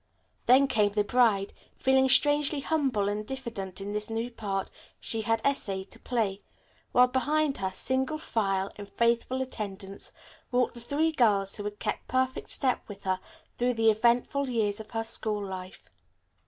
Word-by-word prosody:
Then 260 +3 +7
came 210 -6 +2
the 210 0 +2
bride, 210 -4 +2 0.2
feeling 265 0 +3
strangely 290 +1 +3
humble 270 -10 +1
and 205 +1 -1
diffident 215 -7 -5
in 200 +1 -5
this 210 +1 -1
new 225 +2 -2
part 195 -4 -3 0.3
she 225 - -1
had 225 +1 0
essayed 195 -9 -1
to - - -9
play, 210 -5 -1 0.5
while 250 - +7
behind 290 +3 +1
her, 190 -1 -2
single 260 +9 -1
file, 195 -9 -1
in 205 -1 -8
faithful 235 +4 +1
attendance, 200 -5 -6 0.4
walked 250 0 +2
the 240 - -8
three 295 +7 +1
girls 205 -9 +2
who 205 - -5
had 205 0 -4
kept - - -3
perfect 260 0 0
step 260 -2 +1
with 200 -1 -10
her 185 -1 0 0.4
through 245 0 +2
the 225 -1 +5
eventful 240 +5 +2
years 215 -4 +1
of 220 - -9
her 225 -1 -2
school 220 -2 0
life. 185 -1 -8
225 Hz, 165 wpm, -28 LUFS, 205-260 Hz, 0.5 s, Then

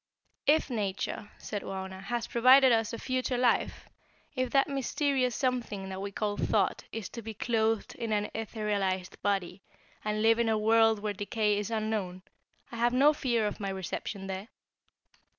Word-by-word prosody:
"If 295 -1 +3
Nature," 205 -1 -3
said 205 -2 -5
Wauna, 190 0 -6
"has 235 +4 -2
provided 255 +2 +6
us 225 -2 +2
a 230 - -4
future 255 0 -1
life, 245 -1 +1 0.5
if 255 -1 0
that 275 +2 +3
mysterious 270 -2 0
something 235 -7 -2
that 190 0 -5
we 200 0 -4
call 205 0 -2
Thought - - +1
is 225 -3 -5
to 235 - -7
be 220 0 -7
clothed 225 -1 0
in 230 -2 -4
an 210 0 0
etherealized 205 -4 -2
body, 195 -2 -1 0.4
and 215 0 -1
live 225 +1 +5
in 230 -1 +2
a 220 - +2
world 225 +1 +4
where 210 -1 -1
decay 210 +1 0
is 205 0 -3
unknown, 215 -5 -2 0.5
I 235 - -6
have 240 +1 +2
no 285 +4 +5
fear 240 -6 0
of 210 - -3
my 200 -1 -3
reception 190 +1 -4
there. 190 +2 -5
220 Hz, 170 wpm, -30 LUFS, 200-240 Hz, 0.5 s, provided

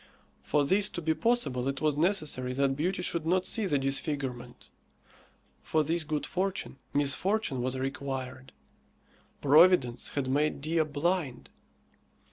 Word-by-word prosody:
For 145 -1 +1
this 195 +6 +4
to - - 0
be 160 -1 0
possible 155 - 0
it 135 0 -2
was 155 -2 +1
necessary 150 -7 0
that 135 0 +1
beauty 180 +5 -1
should 170 -2 -2
not 180 +3 +1
see 220 -3 0
the 145 - +1
disfigurement. 135 -3 -2 0.9
For 155 -1 +1
this 165 +2 +1
good 155 -1 -2
fortune, 185 -7 -3
misfortune 145 - 0
was 130 +1 -2
required. 135 -1 -5 0.9
Providence 145 -4 +4
had 140 -2 -1
made 145 +3 +1
Dea 160 +3 0
blind. 150 -2 -2
145 Hz, 130 wpm, -29 LUFS, 135-175 Hz, 0.9 s, this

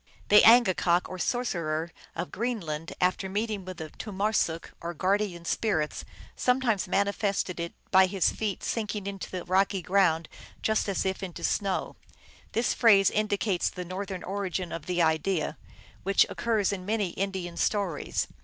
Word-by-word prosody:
" - - -27
The 210 0 +8
angakok" 190 -6 +5
or 185 - -7
sorcerer 170 -9 -1 0.2
of 170 +2 -4
Greenland, 170 -9 -3
" - - -34
after 190 +1 -6
meeting 210 0 -2
with 185 -1 -7 0.2
tomarsuk, 200 -5 -1
or 170 +1 -5
guardian 185 -1 0
spirits, 165 -5 -1 0.3
sometimes 250 -6 +1
manifested 200 -1 0
it 170 0 -4 0.2
by 190 0 +7
his 185 -2 +1
feet 210 -3 -3
sinking 210 -3 -2
into 200 -1 -5
the 185 -2 -5
rocky 190 +1 +1
ground 170 -4 +2 0.4
fust 220 -1 +1
as 195 - -1
if 190 0 -1
into 185 -3 -6
snoiv." 195 -2 +1
(Rink.) - - -31 0.6
This 230 +2 +1
phrase 200 -4 +5
indicates 205 -3 0
the 180 - -7
Northern 185 +1 -5
origin 190 -2 -3
of 165 - -6
the 175 -1 +2
idea, 160 +1 0 0.4
which 195 +1 +4
occurs 215 -4 0
in 185 -2 -5
many 210 -1 0
Indian 185 -1 -3
stories. 195 -8 -1
190 Hz, 155 wpm, -28 LUFS, 175-205 Hz, 0.6 s, The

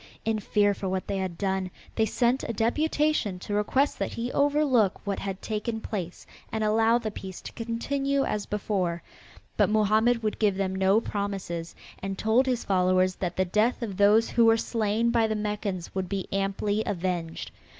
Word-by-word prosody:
In 220 -1 +1
fear 205 0 +2
for 195 -1 -4
what 185 0 -2
they 200 - -2
had 185 -3 -3
done, 190 -1 -1 0.2
they 220 -1 +1
sent 245 +4 +1
a 230 - -3
deputation 295 -2 +1
to 195 +3 -6
request 260 +7 +1
that - - -2
he 240 +2 -3
overlook 280 -10 +2
what 200 -1 -2
had 195 -1 -5
taken 220 +1 -2
place 185 -6 -5 0.3
and 220 -1 -1
allow 225 +2 +4
the 225 -3 -4
peace 190 -2 -8
to - - -8
continue 275 +4 -1
as 210 -5 -2
before, 190 -5 -1 0.5
but - - +4
Mohammed 220 +2 +3
would 215 - -2
give 210 -3 +3
them 190 -1 -1
no 190 +2 +3
promises, 195 -6 -4 0.2
and 195 0 -4
told 230 +5 +2
his 250 -2 0
followers 185 -1 +2
that 180 -2 -3
the 185 - +1
death 215 +7 +1
of 205 -4 -4
those 210 +3 +4
who 235 - +4
were 225 0 +6
slain 225 0 0
by 230 -2 +3
the 220 - -1
Meccans 210 -4 -3
would 190 -2 -3
be 195 -2 -2
amply 195 +2 0
avenged. 175 -4 -3
210 Hz, 180 wpm, -27 LUFS, 190-230 Hz, 0.5 s, were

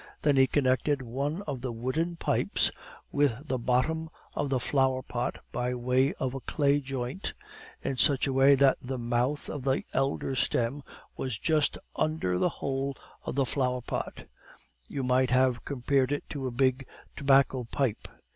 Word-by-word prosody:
Then 145 -2 +4
he 135 0 +6
connected 135 +1 +1
one 140 - -3
of 140 -8 -4
the 130 -1 -3
wooden 130 +9 -1
pipes - - +1 0.4
with 145 0 +1
the 130 -2 -1
bottom 145 +7 +1 0.2
of 145 - -1
the 130 -2 +1
flower 130 0 +1
pot 120 0 -3
by 125 +1 -1
way 125 +3 +2
of 130 -1 -2
a 135 - -4
clay 145 +1 +2
joint, 135 +4 -4 0.5
in 135 - -2
such 140 0 +4
a 135 - -1
way 135 +1 +6
that 135 0 +4
the 130 +1 -4
mouth 120 +4 0
of 145 - -5
the 135 0 +1
elder 135 0 0
stem 125 +2 0 0.3
was 130 -5 -3
just 155 -1 +1 0.2
under 155 - 0
the - - +3
hole 135 -2 -3 0.3
of - - -3
the 135 -1 +2
flower 125 -1 0
pot; - - -4 0.6
you 135 - -3
might 125 0 +3
have 125 -1 +2
compared 135 0 +1
it 145 - -2
to 135 -3 -3
a - - -3
big 130 +1 +1 0.3
tobacco 135 -2 +3
pipe. 120 -1 -1
135 Hz, 165 wpm, -29 LUFS, 125-140 Hz, 0.6 s, he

